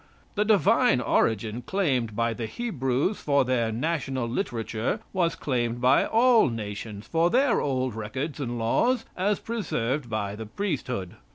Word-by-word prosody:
The 210 0 +1
divine 215 - +4
origin 110 -1 +1
claimed 130 - 0
by 115 +1 +1
the 115 0 -4
Hebrews 145 - -1
for 140 -2 +2
their 120 -3 +1
national 130 -1 -2
literature 115 - -2
was 175 -3 +1
claimed 120 -3 -1
by 130 +2 +4
all 235 - +5
nations 105 -2 -6
for 165 +1 +2
their 255 +2 +3
old 130 -3 -1
records 130 +8 -4
and 120 -3 -3
laws 225 - +1
as 200 +2 +1
preserved 145 - -2
by 105 -2 -2
the 110 0 -7
priesthood. 125 - -3
130 Hz, 145 wpm, -26 LUFS, 115-185 Hz, -, all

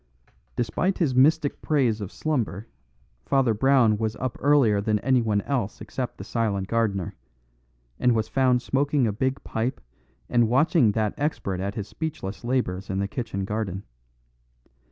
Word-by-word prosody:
Despite 150 - 0
his 155 -7 +1
mystic 145 +3 +3
praise 125 -8 +1
of 100 - -5
slumber, 115 - -2 0.6
Father 135 -4 +2
Brown 115 -2 +3
was 110 -1 -1
up 130 -2 -3
earlier 135 -8 +4
than 105 +1 +1
anyone 115 -6 +2
else 125 -7 -2
except 125 -2 -5
the - - -7
silent 100 -5 -1
gardener; 105 -6 0 0.9
and 125 -2 +3
was 110 -1 0
found 130 -2 +2
smoking 140 0 +1
a 105 - 0
big 130 +5 -1
pipe 120 +4 -2 0.5
and 120 -2 +2
watching 130 - +3
that 110 -1 0
expert 120 - -2
at 100 +2 -3
his 105 -2 -4
speechless 115 - -5
labours 120 -7 -1
in 95 - -2
the 100 0 0
kitchen 100 -3 -4
garden. 100 -2 -3
115 Hz, 150 wpm, -25 LUFS, 105-135 Hz, 0.9 s, earlier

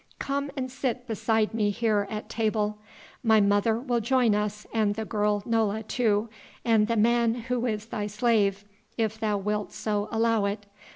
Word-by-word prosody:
Come 280 +1 -2
and 260 -1 -3
sit 255 -2 -2
beside 220 -1 0
me 215 -2 +1
here 210 -1 +1
at 215 -1 -5
table; 215 -1 -1 0.4
my 220 -3 +5
mother 205 +2 +3
will 245 -2 0
join 240 -1 +3
us 210 0 -2
and 215 -2 +1
the 220 0 -3
girl 210 -1 0
Nola 220 -2 +1
too, 220 -1 +1 0.4
and 220 -2 +4
the 230 0 0
man 235 +1 +3
who 245 0 -2
is 215 -2 -2
thy 210 -2 -3
slave, 210 -2 +1 0.3
if 220 -1 -1
thou 215 -2 0
wilt 210 +1 -2
so 210 0 -2
allow 225 -2 +2
it. 200 +1 -3
220 Hz, 170 wpm, -27 LUFS, 210-230 Hz, 0.4 s, my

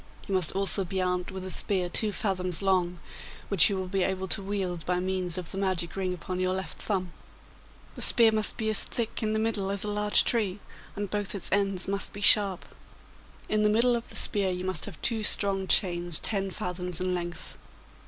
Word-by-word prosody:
You 200 - -3
must 185 -4 +1
also 195 0 +2
be 190 +1 -4
armed 180 -1 -1
with 190 -1 -7
a 185 - -4
spear 185 -2 0
two 210 +4 +1
fathoms 185 -3 -1
long, 180 -2 +1 0.5
which 195 -2 +6
you 200 - -1
will 190 - -3
be 190 +1 -1
able 190 0 -1
to 200 - +3
wield 190 -4 -3
by 180 +2 -1
means 185 -1 -2
of 180 -3 -5
the 195 - -5
magic 185 -3 -1
ring 190 -1 -2
upon 180 +1 -5
your 185 0 0
left 190 -4 -6
thumb. 185 -4 -2 0.8
The - - -8
spear 230 -3 +6
must 215 -1 0
be 220 - -2
as 215 - +7
thick 230 -2 -4
in 215 -1 -1
the - - 0
middle 220 -3 0
as 200 0 0
a - - 0
large 210 0 +3
tree, 210 -5 -1 0.4
and 205 -1 -5
both 205 -1 -2
its 195 - -2
ends 195 -2 +1
must 200 0 -3
be 205 - -8
sharp. 200 -3 +5 0.8
In 215 0 0
the 210 - +3
middle 235 +3 +3
of 235 - -5
the - - -7
spear 200 -3 +1
you 180 0 -4
must 185 -5 -1
have 200 -6 -10
two 230 -2 0
strong 195 -2 +1
chains 175 -4 +2
ten 195 -2 0
fathoms 180 -2 -4
in 185 0 -1
length. 175 -2 -5
190 Hz, 210 wpm, -27 LUFS, 180-205 Hz, 0.8 s, as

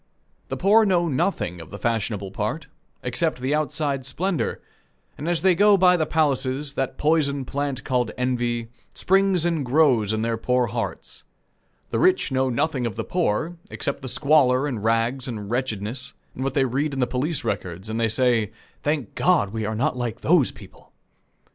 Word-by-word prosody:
The - - -3
poor 210 +4 +5
know 180 -4 +2
nothing 130 - -1
of 80 - -11
the 100 - -8
fashionable 105 -4 -2
part, 110 +11 -3 0.4
except 125 +5 0
the 130 +3 -1
outside 145 -2 -1
splendor; 175 +7 -2 0.6
and 155 +4 -4
as 175 0 0
they 190 -1 +5
go 205 +3 +5
by 180 -1 +5
the 160 -3 0
palaces, 140 -2 0
that 135 -2 -2
poison 145 -3 +1
plant 140 0 -3
called 125 -3 0
envy, 120 -2 -1 0.3
springs 190 -2 +2
and 165 -4 0
grows 125 -6 +3
in 110 0 -1
their 115 0 0
poor 125 +2 +1
hearts. 115 +1 -5 0.7
The - - 0
rich 370 - +3
know 130 0 +1
nothing 130 0 0
of 110 - -5
the - - -3
poor, 170 0 -1
except 140 0 -3
the 130 - -6
squalor 135 -1 +3
and 120 -8 -3
rags 115 +4 +1
and 105 -4 -5
wretchedness, 120 -1 -3 0.2
and 130 - -5
what 135 -1 -2
they 135 -2 +3
read 140 +4 -1
in - - -3
the 125 - +3
police 135 +5 -2
records, 95 -4 -4
and 110 +1 -3
they 115 -1 +2
say, 115 -2 +2 0.3
"Thank 145 -6 -1
God, 160 - +2
we 110 -2 -2
are 110 - -2
not 130 +5 0
like 120 -1 -4
those 155 -4 +3
people!" 100 -1 -16
130 Hz, 180 wpm, -24 LUFS, 115-155 Hz, 0.7 s, poor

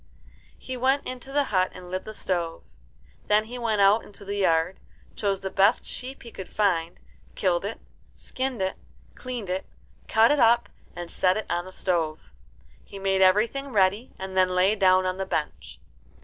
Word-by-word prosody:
He 260 - -6
went 265 +3 +1
into 255 +1 -6
the 290 +1 +2
hut 185 -1 +3
and 180 -1 -10
lit 185 0 -3
the 215 - -7
stove. 170 -4 -2 0.6
Then 210 +1 +3
he 245 +2 -7
went 220 -3 +1
out 200 +3 +5
into 200 0 -11
the 200 +1 -3
yard, 170 -1 +2 0.4
chose 195 -2 -1
the 190 -1 -4
best 200 +5 +3
sheep 260 +2 -7
he 235 - -10
could 190 - -8
find, 175 -5 0 0.4
killed 180 -1 +1
it, 210 - -4 0.4
skinned 260 -5 -3
it, 190 - -2 0.4
cleaned 245 -7 -6
it, 185 +1 -3 0.4
cut 225 +3 +5
it 295 - +2
up, 235 0 +4 0.3
and 175 -1 -7
set 185 +1 +2
it 215 - -3
on 175 +1 -1
the 185 - -9
stove. 170 -5 -1 0.6
He 200 - -11
made 195 0 +1
everything 215 +9 +3
ready, 205 +3 +2
and 190 0 -6
then 185 -1 +3
lay 185 +3 +4
down 185 -2 +4
on 185 0 -1
the 190 - -2
bench. 150 -5 -4
195 Hz, 180 wpm, -26 LUFS, 185-225 Hz, 0.6 s, out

